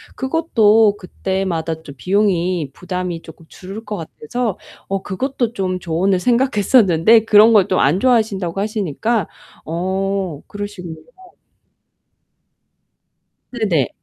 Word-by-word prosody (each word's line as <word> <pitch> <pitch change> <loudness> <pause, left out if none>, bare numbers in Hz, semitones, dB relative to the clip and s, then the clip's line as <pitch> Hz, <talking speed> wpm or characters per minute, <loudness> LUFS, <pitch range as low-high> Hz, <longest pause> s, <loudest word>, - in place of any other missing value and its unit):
그것도 225 -8 +3
그때마다 180 -4 -3
좀 140 -3 -11
비용이 180 -6 0
부담이 180 -1 -4
조금 160 0 -14
줄을 195 +4 -9
것 210 0 -4
같아서 195 +7 -4 0.3
어 195 -1 -2
그것도 240 +3 -2
좀 185 -3 -2
조언을 180 +2 0
생각했었는데 225 -3 +3
그런 220 +1 +6
걸 200 -4 +5
또 185 - +1
안 150 +8 +3
좋아하신다고 200 -7 +1
하시니까 210 0 -1 0.4
어 190 -1 -2
그러시군요. 205 -5 -7 2.5
네네. 200 - 0
195 Hz, 250 characters per minute, -18 LUFS, 175-220 Hz, 2.5 s, 그런